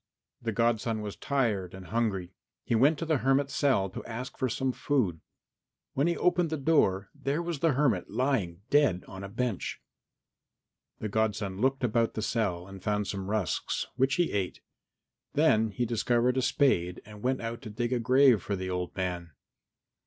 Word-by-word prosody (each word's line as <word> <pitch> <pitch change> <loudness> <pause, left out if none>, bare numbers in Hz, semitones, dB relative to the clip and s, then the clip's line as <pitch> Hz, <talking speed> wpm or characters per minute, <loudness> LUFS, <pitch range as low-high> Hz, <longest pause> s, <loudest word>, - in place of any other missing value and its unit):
The 115 - -1
godson 115 0 +1
was 105 -1 -5
tired 105 -10 -1
and 95 -1 -10
hungry. 95 -5 -1 0.3
He - - -2
went 140 +7 +4
to 165 - -3
the 155 -4 +1
hermit's 135 +2 +2
cell 130 -9 +2
to - - -7
ask 125 +2 -6
for 130 -2 -1
some 130 +3 0
food. 120 - 0 0.7
When 140 +4 +2
he 170 - +1
opened 175 -1 +2
the 160 - -2
door 100 -11 +2
there 140 +3 -2
was 170 -4 -3
the 165 -1 +3
hermit 125 - +1
lying 105 -8 -1
dead 140 -12 +3
on 95 0 -8
a 100 - -6
bench. 120 -1 -2 1.2
The 110 - -4
godson 105 -2 -1
looked 135 +1 +1
about 115 -1 +1
the 110 - -2
cell 95 -7 -1
and 95 -1 -10
found 105 +1 0
some 95 -1 -4
rusks, 105 -4 -1
which 135 +2 +2
he 175 -2 +1
ate; 95 -3 -2 0.7
then 110 0 +4
he 115 +4 -1
discovered 120 +2 +1
a 130 - +2
spade 90 -11 +2
and 105 0 -12
went 130 +2 0
out 115 0 -5
to 110 - -8
dig 120 +4 -2
a 125 - +1
grave 125 -2 +5
for 100 - -2
the 95 0 -4
old 90 -1 -3
man. 90 -3 -3
115 Hz, 180 wpm, -29 LUFS, 95-135 Hz, 1.2 s, grave